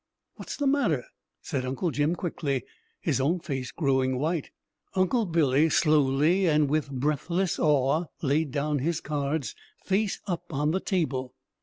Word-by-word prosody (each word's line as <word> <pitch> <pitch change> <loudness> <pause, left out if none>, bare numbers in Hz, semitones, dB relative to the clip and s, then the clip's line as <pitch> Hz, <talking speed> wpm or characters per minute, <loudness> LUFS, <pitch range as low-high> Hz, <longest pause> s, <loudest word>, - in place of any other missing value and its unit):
"What's - - -7
the 285 - -1
matter?" 245 - +2 0.4
said 130 -2 -2
Uncle 135 +7 -1
Jim 150 +4 +1
quickly, 145 -7 -2 0.4
his - - 0
own 165 +7 +1
face 135 -5 -4
growing 130 -4 +1
white. 155 +2 -1 0.5
Uncle 190 +4 +2
Billy 155 -2 +3
slowly 155 +4 +3
and 150 -2 +3
with 150 0 0
breathless 150 +7 -1
awe 150 +2 +2 0.2
laid 150 +2 +1
down 145 +2 -1
his 160 +4 0
cards, 145 -5 -2 0.3
face 195 +1 0
up 175 -2 -4
on 150 +1 +1
the 185 - +1
table. 135 -10 -2
150 Hz, 145 wpm, -27 LUFS, 135-170 Hz, 0.5 s, Billy